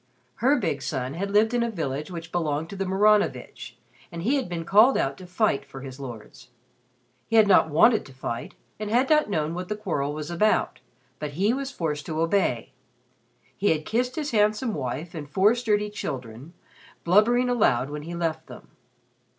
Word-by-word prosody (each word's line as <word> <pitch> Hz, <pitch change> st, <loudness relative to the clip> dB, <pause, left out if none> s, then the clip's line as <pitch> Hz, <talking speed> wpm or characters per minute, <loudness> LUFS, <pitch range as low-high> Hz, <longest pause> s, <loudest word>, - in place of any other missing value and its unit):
Her 265 Hz, +6 st, +3 dB
big 160 Hz, -, -2 dB
son 130 Hz, 0 st, -3 dB
had 195 Hz, +5 st, -3 dB
lived 215 Hz, +3 st, +3 dB
in 240 Hz, -, +1 dB
a 235 Hz, -, 0 dB
village 150 Hz, -7 st, -4 dB
which 165 Hz, -2 st, -8 dB
belonged 160 Hz, -2 st, -2 dB
to -, -, -6 dB
the 195 Hz, -1 st, -3 dB
Maranovitch 190 Hz, -, +1 dB, 0.3 s
and 170 Hz, 0 st, -6 dB
he 245 Hz, +8 st, +1 dB
had 260 Hz, -8 st, -3 dB
been 170 Hz, -2 st, -4 dB
called 215 Hz, +9 st, +5 dB
out 135 Hz, 0 st, 0 dB
to 185 Hz, -, -10 dB
fight 180 Hz, -6 st, +1 dB
for 135 Hz, -1 st, -11 dB
his 130 Hz, 0 st, -9 dB
lords. 110 Hz, -, -10 dB, 0.8 s
He -, -, -1 dB
had 220 Hz, -2 st, +6 dB
not 190 Hz, -4 st, +5 dB
wanted 215 Hz, +10 st, +4 dB
to -, -, -14 dB
fight 120 Hz, -2 st, -5 dB, 0.2 s
and 215 Hz, -1 st, -4 dB
had 250 Hz, +6 st, +2 dB
not 305 Hz, -6 st, +4 dB
known 155 Hz, -4 st, -1 dB
what 180 Hz, +1 st, -5 dB
the 210 Hz, -, -1 dB
quarrel 155 Hz, -9 st, -2 dB
was 155 Hz, +2 st, -6 dB
about, 210 Hz, +5 st, +1 dB, 0.4 s
but 150 Hz, -1 st, -5 dB
he 200 Hz, +9 st, +1 dB
was 270 Hz, +1 st, -3 dB
forced 155 Hz, -, -4 dB
to 160 Hz, -1 st, -3 dB
obey. 165 Hz, -, 0 dB, 0.8 s
He 205 Hz, -, +1 dB
had 155 Hz, -1 st, 0 dB
kissed 245 Hz, +3 st, -1 dB
his 300 Hz, -2 st, -3 dB
handsome 215 Hz, +2 st, +1 dB
wife 140 Hz, +4 st, -4 dB
and 150 Hz, -4 st, -7 dB
four 195 Hz, +8 st, +4 dB
sturdy 210 Hz, -4 st, 0 dB
children, 130 Hz, -, -6 dB, 0.5 s
blubbering 225 Hz, +8 st, +4 dB
aloud 145 Hz, -, +2 dB
when 150 Hz, 0 st, -5 dB
he 170 Hz, +3 st, -7 dB
left 160 Hz, -2 st, -2 dB
them. -, -, -12 dB
175 Hz, 190 wpm, -25 LUFS, 145-215 Hz, 0.8 s, had